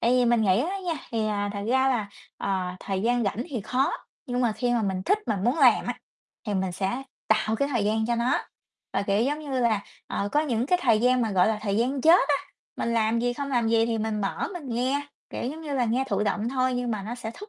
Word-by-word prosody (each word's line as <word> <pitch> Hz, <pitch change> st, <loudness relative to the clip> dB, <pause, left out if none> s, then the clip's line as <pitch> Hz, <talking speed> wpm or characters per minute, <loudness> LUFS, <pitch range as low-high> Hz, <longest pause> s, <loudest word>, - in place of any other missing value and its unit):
Tại 235 Hz, -, +2 dB
vì 250 Hz, -1 st, +4 dB
mình 235 Hz, -1 st, +3 dB
nghĩ 195 Hz, +2 st, +3 dB
á 365 Hz, +8 st, -1 dB
nha 345 Hz, -, 0 dB, 0.2 s
thì, 225 Hz, -2 st, 0 dB
à, 205 Hz, -1 st, -1 dB
thật 200 Hz, -, -4 dB
ra 260 Hz, +2 st, +3 dB
là, 230 Hz, -6 st, 0 dB, 0.3 s
ờ, 185 Hz, -2 st, -2 dB
thời 195 Hz, -1 st, -2 dB
gian 240 Hz, 0 st, +2 dB
rảnh 210 Hz, +4 st, -1 dB
thì 250 Hz, -7 st, -3 dB
khó 255 Hz, +7 st, +1 dB, 0.4 s
nhưng 245 Hz, 0 st, -1 dB
mà 240 Hz, -3 st, +2 dB
khi 245 Hz, +2 st, -1 dB
mà 235 Hz, -2 st, +1 dB
mình 190 Hz, -2 st, -1 dB
thích 405 Hz, -, +2 dB
mà 210 Hz, -, 0 dB
muốn 240 Hz, -, 0 dB
làm -, -, +5 dB
á -, -, -3 dB, 0.5 s
thì 210 Hz, -, -1 dB
mình 190 Hz, -1 st, -1 dB
sẽ 195 Hz, +8 st, -2 dB, 0.3 s
tạo 220 Hz, 0 st, +2 dB
cái 280 Hz, -, 0 dB
thời 240 Hz, -7 st, 0 dB
gian 220 Hz, +1 st, +1 dB
cho 240 Hz, -, +1 dB
nó. 235 Hz, +2 st, +2 dB, 0.5 s
Và, 195 Hz, -, 0 dB
kiểu 200 Hz, +2 st, +1 dB
giống 290 Hz, +4 st, 0 dB
như 275 Hz, -4 st, -3 dB
là, 225 Hz, -4 st, +2 dB, 0.3 s
ờ, 200 Hz, -, -2 dB
có 295 Hz, -, +4 dB
những 250 Hz, -6 st, 0 dB
cái 360 Hz, +4 st, +3 dB
thời 225 Hz, -4 st, +4 dB
gian 250 Hz, +1 st, +3 dB
mà 225 Hz, -, 0 dB
gọi 185 Hz, +1 st, +4 dB
là 220 Hz, -1 st, 0 dB
thời 200 Hz, -2 st, 0 dB
gian 255 Hz, +5 st, +1 dB
chết 320 Hz, +1 st, +5 dB
á, 290 Hz, -, +4 dB, 0.4 s
mình 235 Hz, -, -1 dB
làm 225 Hz, 0 st, +2 dB
gì, 245 Hz, +1 st, +1 dB
không 280 Hz, +3 st, -4 dB
làm 240 Hz, -3 st, +1 dB
gì 225 Hz, 0 st, +3 dB
thì 230 Hz, -1 st, -1 dB
mình 215 Hz, -1 st, -1 dB
mở 195 Hz, -, -2 dB
mình 335 Hz, -7 st, -7 dB
nghe, 260 Hz, +5 st, -1 dB, 0.2 s
kiểu -, -, -4 dB
giống 315 Hz, +3 st, -8 dB
như 300 Hz, -3 st, -4 dB
là, 255 Hz, -3 st, +2 dB
nghe 245 Hz, +4 st, +1 dB
thụ 200 Hz, 0 st, 0 dB
động 210 Hz, +2 st, 0 dB
thôi 255 Hz, -1 st, +1 dB
nhưng 245 Hz, -1 st, -1 dB
mà 210 Hz, -3 st, -2 dB
nó 220 Hz, +4 st, -5 dB
sẽ 240 Hz, -2 st, -6 dB
thúc 415 Hz, +1 st, -10 dB
235 Hz, 270 wpm, -26 LUFS, 210-255 Hz, 0.5 s, làm